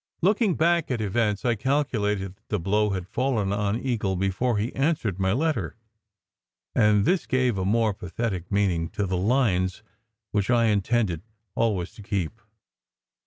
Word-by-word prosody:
Looking 205 -1 +3
back 170 0 +2
at 125 -3 -1
events, 105 0 0
I 120 - +3
calculated 105 -6 0
that 110 +3 -36
the - - 0
blow 105 +4 +1
had 95 -2 -3
fallen 115 -3 0
on 105 +2 0
Eagle 115 -8 -1
before 95 +6 0
he 110 +4 -2
answered 135 - 0
my 95 0 +2
letter, 155 +7 0 1.0
and 105 -1 +4
this 185 -1 +1
gave 130 -3 +2
a 95 -1 -2
more 110 +1 +2
pathetic 95 -1 -4
meaning 90 -5 +1
to 105 - +1
the 95 -1 -1
lines 95 -2 +1 0.5
which 105 0 0
I 120 -2 +4
intended 105 -4 +1 0.3
always 100 -6 0
to - - -12
keep. 100 0 -3
105 Hz, 155 wpm, -25 LUFS, 95-120 Hz, 1.0 s, and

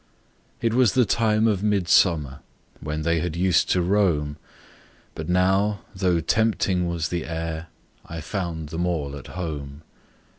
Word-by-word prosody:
It 115 -1 +1
was 125 -3 +4
the 125 -2 +4
time 110 0 +2
of 100 -4 +1
midsummer 90 -8 +2 0.4
When 75 +1 -4
they 85 0 +1
had 85 0 -3
used 90 +1 +2
to 90 - +2
roam; 85 -7 +1 0.8
But 80 +1 -6
now, 95 +3 +2
though 90 -3 +1
tempting 95 -2 +1
was 85 -2 -2
the 85 -2 -3
air, 80 0 -4 0.4
I 80 - -7
found 80 -2 -4
them 85 +3 -2
all 75 -5 -2
at 70 - -9
home. 75 -4 -6
85 Hz, 145 wpm, -24 LUFS, 80-100 Hz, 0.8 s, was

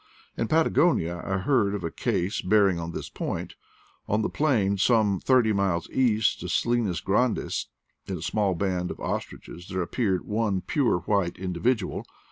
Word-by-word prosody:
In 115 - -1
Patagonia 155 - +2
I 95 -1 -1
heard 100 -1 +1
of 100 - -5
a 85 - -3
case 90 +4 -1
bearing 100 -2 +3
on 85 0 -4
this - - -5
point. - - -4 0.5
On 110 +1 +1
the - - -1
plain 105 -10 +1
some 105 -3 +3
thirty 125 -5 +3
miles 95 -4 0
east 110 -4 +2
of - - -5
Salinas 115 -9 0
Grandes, 115 +4 0 0.4
in 95 - -3
a 80 - -7
small 95 +1 0
band 90 -1 -1
of - - -7
ostriches 85 +2 -5
there 95 -1 -2
appeared 95 -1 -1
one 105 -3 0
pure 120 - +1
white 95 -1 0
individual. 95 +4 -1
100 Hz, 160 wpm, -26 LUFS, 90-115 Hz, 0.5 s, bearing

